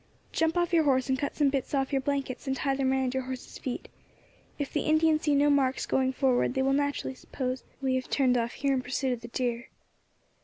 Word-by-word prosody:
"Jump 325 +1 +1
off 345 0 +1
your 325 -2 +4
horse, 260 -1 +2
and 260 0 +1
cut 285 - -2
some 290 -2 +3
bits 275 0 -1
off 270 -1 0
your 270 -1 +1
blankets 275 -1 -3
and 265 - 0
tie 275 0 0
them 270 -1 +1
round 265 -1 +1
your 265 - 0
horse's 260 -1 -7
feet. 255 - -4 0.7
If 285 -2 -4
the - - +1
Indians 310 0 +3
see 295 -2 +2
no 290 +1 +4
marks 270 -2 +2
going 260 0 +1
forward, 260 -1 +1
they 265 - +2
will 270 0 +2
naturally 285 -1 0
suppose 255 0 -4 0.2
we 265 -1 +1
have 260 -1 -2
turned 260 -3 +3
off 235 -1 0
here 280 -1 0
in 260 - +1
pursuit 260 +1 -1
of 235 - -6
the 235 - -8
deer." 240 0 -2
265 Hz, 230 wpm, -28 LUFS, 255-285 Hz, 0.7 s, your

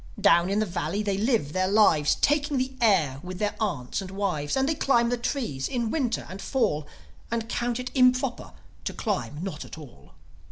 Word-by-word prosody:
Down 170 +2 +5
in 200 - 0
the 215 - +2
valley 175 +2 -2
they 200 -2 0
live 215 - +1
their 185 0 +1
lives, 190 -8 +4
Taking 290 -1 +1
the 260 +1 -1
air 165 - +3
with 180 +1 -7
their 205 +1 -1
aunts 150 - -2
and 190 - -7
wives. 190 - -1
And 265 0 +2
they 320 - +2
climb 240 -5 +2
the 245 - +1
trees 235 - -2
in 245 -3 -1
the 225 - -1
Winter 245 -4 -1
and 190 +1 -8
Fall, 155 - 0 0.4
And 230 -1 -2
count 240 0 -1
it 250 0 -5
improper 255 -1 +2 0.3
to - - -2
climb 185 - -3
not 170 -6 -5
at - - -10
all. 150 -6 -14
210 Hz, 200 wpm, -26 LUFS, 170-245 Hz, 0.4 s, Down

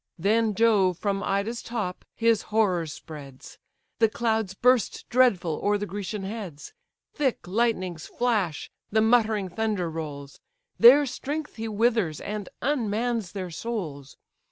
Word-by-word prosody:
Then 215 +4 +2
Jove 200 -6 +3
from 200 0 -1
Ida's 200 +4 -1
top 215 -6 -4
his 230 -2 +3
horrors 185 -7 +1
spreads; 140 -4 -11 0.4
The 225 -2 +5
clouds 220 -4 -1
burst 250 +2 +2
dreadful 195 -11 +3
o'er 205 0 +3
the 205 - -3
Grecian 200 +1 -5
heads; 190 -8 -7 0.4
Thick 270 - -1
lightnings 185 -5 -1
flash; 210 -10 -1 0.2
the 220 - +3
muttering 220 -3 +3
thunder 195 -3 -1
rolls; 145 -3 -7 0.4
Their 275 +5 +9
strength 295 +3 -5
he 225 0 -3
withers, 220 -7 +1
and 210 -2 -5
unmans 230 -5 -1
their 185 -3 -5
souls. 160 - -5
210 Hz, 130 wpm, -26 LUFS, 180-230 Hz, 0.4 s, Their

